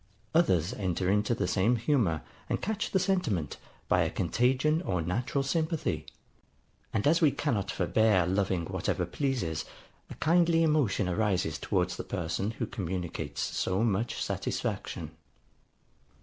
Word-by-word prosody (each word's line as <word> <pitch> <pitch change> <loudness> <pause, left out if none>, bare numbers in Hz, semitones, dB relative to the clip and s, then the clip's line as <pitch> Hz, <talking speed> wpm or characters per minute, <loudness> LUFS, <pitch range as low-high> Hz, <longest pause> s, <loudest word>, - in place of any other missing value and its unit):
Others 95 - +3
enter 95 -1 -1
into 105 +3 +2
the 100 - -1
same 100 +7 +2
humour, 110 - +1 0.3
and - - 0
catch 215 +1 -2
the - - +2
sentiment, 180 - 0 0.3
by - - +3
a - - +1
contagion 130 - +1
or 90 - -1
natural 115 - -1
sympathy; 155 - -1 0.8
and 110 - -1
as 160 +3 +4
we 155 - +6
cannot 120 -8 -1
forbear 110 -5 +3
loving 95 -2 0
whatever - - -1
pleases, 120 - -1 0.5
a - - -8
kindly 165 0 +3
emotion 145 - +2
arises 90 -5 0
towards - - 0
the - - -4
person 85 +4 -2
who 110 - -3
communicates 90 -5 -4
so 95 +4 0
much 115 +1 0
satisfaction. - - -3
105 Hz, 135 wpm, -29 LUFS, 90-145 Hz, 0.8 s, we